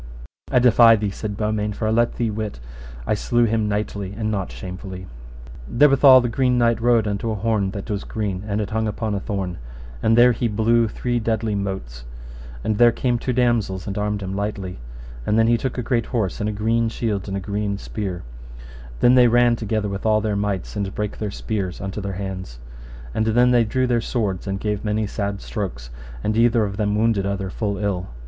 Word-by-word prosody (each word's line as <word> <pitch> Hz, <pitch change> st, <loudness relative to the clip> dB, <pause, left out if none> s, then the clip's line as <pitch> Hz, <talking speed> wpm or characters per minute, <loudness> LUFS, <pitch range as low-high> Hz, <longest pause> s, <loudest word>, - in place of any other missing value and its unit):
I -, -, +3 dB
defy 120 Hz, -2 st, +7 dB
thee, 105 Hz, -2 st, -2 dB
said 105 Hz, 0 st, -5 dB
Beaumains, 105 Hz, -1 st, -1 dB
for 110 Hz, -, -1 dB
I -, -, +1 dB
let 120 Hz, +1 st, +2 dB
thee 115 Hz, -2 st, -1 dB
wit 105 Hz, -, -4 dB, 0.5 s
I -, -, +1 dB
slew 120 Hz, +3 st, +1 dB
him 110 Hz, -1 st, 0 dB
knightly 100 Hz, -1 st, -3 dB
and 110 Hz, -1 st, -1 dB
not 100 Hz, -3 st, -2 dB
shamefully. 95 Hz, 0 st, -7 dB, 0.6 s
Therewithal 135 Hz, -, +7 dB
the 120 Hz, -, -1 dB
Green 125 Hz, +1 st, +1 dB
Knight 115 Hz, -1 st, +2 dB
rode 115 Hz, -2 st, +3 dB
unto 105 Hz, +2 st, -2 dB
an 110 Hz, -, -2 dB
horn 105 Hz, -2 st, 0 dB
that 100 Hz, 0 st, -6 dB
was 100 Hz, -2 st, -3 dB
green, 100 Hz, -3 st, -3 dB
and 105 Hz, 0 st, -1 dB
it 105 Hz, -1 st, -3 dB
hung 110 Hz, 0 st, 0 dB
upon 105 Hz, 0 st, -2 dB
a 100 Hz, -, -1 dB
thorn, 95 Hz, -4 st, -4 dB, 0.4 s
and 115 Hz, +1 st, +3 dB
there 125 Hz, +1 st, +7 dB
he 120 Hz, 0 st, -1 dB
blew 115 Hz, +2 st, +2 dB
three 120 Hz, +3 st, -2 dB
deadly 110 Hz, -1 st, -1 dB
motes, 95 Hz, -13 st, -4 dB, 0.6 s
and 105 Hz, -1 st, -1 dB
there 120 Hz, -1 st, +7 dB
came 120 Hz, 0 st, 0 dB
two 125 Hz, -, -2 dB
damosels 115 Hz, -7 st, +1 dB
and 100 Hz, -, -4 dB
armed 105 Hz, -1 st, -2 dB
him 95 Hz, 0 st, -4 dB
lightly. 100 Hz, -, -4 dB, 0.4 s
And 105 Hz, -, +1 dB
then 115 Hz, -, +5 dB
he 120 Hz, +1 st, +4 dB
took 130 Hz, +2 st, -3 dB
a 125 Hz, -, -2 dB
great 120 Hz, 0 st, 0 dB
horse, 110 Hz, -7 st, -1 dB
and 105 Hz, 0 st, -1 dB
a -, -, -1 dB
green 115 Hz, +2 st, +1 dB
shield 105 Hz, -4 st, -2 dB
and 100 Hz, 0 st, -3 dB
a -, -, -2 dB
green 100 Hz, +1 st, -2 dB
spear. 100 Hz, -4 st, -5 dB, 0.3 s
And -, -, -14 dB
then 120 Hz, -, +6 dB
they 125 Hz, -1 st, +7 dB
ran 120 Hz, 0 st, +4 dB
together 110 Hz, -2 st, -2 dB
with 100 Hz, -1 st, -5 dB
all 110 Hz, -1 st, +3 dB
their 105 Hz, -1 st, -1 dB
mights, 100 Hz, -2 st, -2 dB
and 100 Hz, -1 st, -3 dB
brake 105 Hz, -1 st, -3 dB
their 105 Hz, -, -2 dB
spears 100 Hz, -3 st, -4 dB
unto 100 Hz, +2 st, -5 dB
their 100 Hz, -1 st, -4 dB
hands. 95 Hz, -9 st, -6 dB, 0.6 s
And 110 Hz, -, 0 dB
then 120 Hz, +3 st, +4 dB
they 120 Hz, -2 st, +4 dB
drew 130 Hz, +4 st, 0 dB
their 120 Hz, -2 st, +1 dB
swords, 105 Hz, -6 st, -2 dB
and 95 Hz, 0 st, -2 dB
gave 105 Hz, 0 st, -2 dB
many 105 Hz, 0 st, 0 dB
sad 100 Hz, -1 st, -3 dB
strokes, 75 Hz, -, -5 dB, 0.3 s
and 110 Hz, -, 0 dB
either 115 Hz, 0 st, +4 dB
of 100 Hz, -1 st, -3 dB
them 105 Hz, -1 st, 0 dB
wounded 105 Hz, -3 st, +1 dB
other 100 Hz, -1 st, -3 dB
full 100 Hz, -1 st, -2 dB
ill. 100 Hz, -3 st, -2 dB
105 Hz, 210 wpm, -22 LUFS, 100-115 Hz, 0.6 s, defy